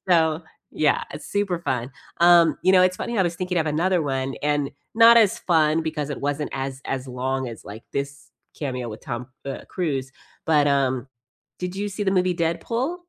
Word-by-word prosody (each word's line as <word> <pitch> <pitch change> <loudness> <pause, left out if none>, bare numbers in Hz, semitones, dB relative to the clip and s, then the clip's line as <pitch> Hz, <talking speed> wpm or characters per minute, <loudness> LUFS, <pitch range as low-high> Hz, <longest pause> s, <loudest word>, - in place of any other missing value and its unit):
So, 160 -2 +3 0.3
yeah, 150 -2 +2
it's 150 - -8
super 195 -4 0
fun. 125 -4 -2 0.3
Um, 170 -3 +6
you 185 - +4
know, 185 -1 +6
it's 185 0 +2
funny, 235 - -4
I - - +5
was 170 -2 -1
thinking 180 0 -2
of 160 -2 +1
another 170 +3 +1
one 135 -1 -2
and 145 -1 +1 0.3
not 230 0 +8
as 215 -4 +4
fun 160 -2 +2
because 150 -2 -3
it - - -5
wasn't 145 +1 -2
as 135 0 -4
as 135 0 -3
long 130 +1 -2
as, 110 -5 -10
like, 110 +3 -10
this 140 +1 -5 0.3
cameo 125 -5 -3
with 110 0 -8
Tom, 120 0 -5 0.2
uh, 135 - -4
Cruise, 140 -7 -2 0.3
but 150 -2 +3
um, 135 -2 +1 0.5
did 180 +1 -4
you 205 +1 -2
see 200 +1 -4
the 190 - +1
movie 185 -1 +2
Deadpool? 230 - -1
155 Hz, 195 wpm, -23 LUFS, 135-180 Hz, 0.5 s, not